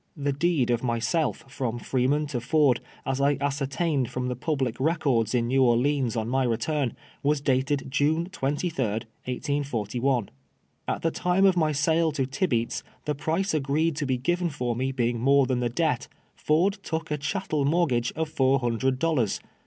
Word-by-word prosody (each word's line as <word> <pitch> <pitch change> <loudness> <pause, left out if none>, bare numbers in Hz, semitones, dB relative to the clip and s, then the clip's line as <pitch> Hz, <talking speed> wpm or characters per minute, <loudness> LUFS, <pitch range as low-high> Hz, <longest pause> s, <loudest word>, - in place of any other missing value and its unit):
The 145 -1 0
deed 145 -4 +1
of 120 -1 +1
myself 120 +5 -1
from 130 -3 -3
Freeman 130 +5 0
to 125 - -2
Furd, 140 -1 +3 0.3
as 135 0 -1
I 140 0 +3
ascertained 140 0 -1
from 125 0 -3
the 125 - -2
puhlic 130 -3 -1
records 130 -7 +1
in 120 -1 +1
Xew 135 +1 +3
Orleans 125 +1 +2
on 110 -1 -1
my 130 +2 +1
return, 125 +2 -1 0.3
was 145 +1 +2
dated 135 0 0
June 155 +4 +1
23d, 140 - -2 0.2
1S41. 125 -3 -1 0.6
At - - -2
the 165 - +2
time 180 +4 +2
of 190 -2 +5
my 155 -3 +2
sale 160 +3 +2
to 135 -3 0
Tibeats, 130 -4 -1 0.2
the 150 - 0
price 160 +7 -1
agreed 155 +2 +1
to 145 - -1
be 130 -1 +1
given 175 +7 0
for 125 -5 -2
me 130 +3 -1
beini;; 120 -2 0
more 140 +3 +4
than 125 -1 0
the 120 -1 0
debt, 120 - 0 0.3
Ford 180 +7 +1
took 160 -1 -4
a 150 - -1
cliattel 155 -1 -1
moi 170 +4 +3
tgafre 120 -5 0
of 160 0 -2
four 135 -3 +3
hundred 130 +1 0
dollars. 130 -8 +1
135 Hz, 175 wpm, -26 LUFS, 125-155 Hz, 0.6 s, of